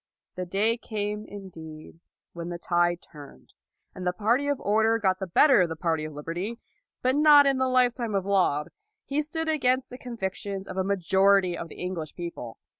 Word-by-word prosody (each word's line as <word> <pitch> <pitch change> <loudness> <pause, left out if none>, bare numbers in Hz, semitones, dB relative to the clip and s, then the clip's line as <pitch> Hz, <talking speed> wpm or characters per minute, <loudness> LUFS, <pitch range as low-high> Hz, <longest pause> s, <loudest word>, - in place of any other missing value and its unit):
The 180 -1 -5
day 210 +6 +1
came, 210 -2 -4
indeed, 165 -6 -11 0.3
when 170 0 -6
the 175 - -4
tide 175 0 0
turned, 145 -3 -14 0.4
and 185 - -8
the 180 - +1
party 235 +8 +1
of 285 -2 0
order 220 +2 +2
got 190 -4 +1
the 190 - -4
better 265 - +5
of 175 - +1
the 160 - -4
party 160 -1 -1
of 155 - -7
liberty, 170 +10 -5 0.5
but 255 +1 +2
not 295 -1 +7
in 270 -1 +2
the 260 - +2
lifetime 245 -3 +1
of 195 -1 0
Laud. 180 -7 +1 0.4
He 285 +2 0
stood 320 +2 -4
against 260 -5 +1
the 250 - -9
convictions 195 -4 -5
of - - -7
a 190 - 0
majority 190 0 +3
of 170 - -6
the - - -12
Eng 185 - -3
lish 160 -4 -6
people. 170 -10 -7
195 Hz, 190 wpm, -26 LUFS, 175-245 Hz, 0.5 s, not